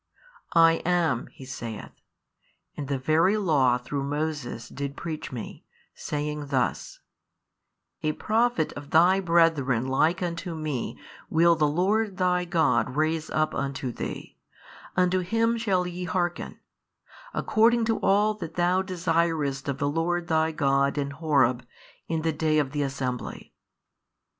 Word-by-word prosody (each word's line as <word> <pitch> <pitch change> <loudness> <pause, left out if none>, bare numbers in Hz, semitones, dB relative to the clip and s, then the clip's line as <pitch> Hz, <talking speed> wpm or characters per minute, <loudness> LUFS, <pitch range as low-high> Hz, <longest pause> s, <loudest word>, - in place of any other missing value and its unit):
I 165 0 +6
am, 165 -8 +1
He 135 - -13
saith, 115 -5 -7 0.8
and 145 - -5
the 140 -1 -1
very 160 +9 +2
law 140 -11 +3
through 140 +3 -4
Moses 145 -5 -3
did 140 +1 -6
preach 160 -2 -5
Me, 120 -4 -7 0.3
saying 150 0 -4
thus, 130 -3 -2 1.0
A 155 - 0
Prophet 225 -5 +1
of 145 0 -9
thy 180 +4 +5
brethren 165 -9 +2
like 160 +7 +2
unto 170 0 -4
me 150 -6 -3 0.3
will 170 +1 +4
the 155 -2 +2
Lord 195 +6 +1
thy 180 -1 +1
God 160 -6 +1
raise 155 +1 0
up 155 0 0
unto 140 -2 -3
thee, - - -7 0.6
unto 180 0 +3
Him 225 +6 +1
shall 195 -6 0
ye 180 0 -5
hearken; 175 0 -2 0.7
according 230 +1 +3
to 225 0 0
all 210 +2 +3
that 165 -6 -8
thou 180 +1 +2
desiredst 165 -6 -1
of 140 -1 -2
the 140 - -1
Lord 170 +3 -1
thy 160 0 +2
God 140 -2 +1
in 140 -1 -1
Horeb 140 -5 +1 0.4
in 160 -1 -2
the 160 -1 +1
day 155 0 +1
of 145 -3 +1
the 145 0 -2
assembly. 130 -3 -4
160 Hz, 140 wpm, -26 LUFS, 140-180 Hz, 1.0 s, I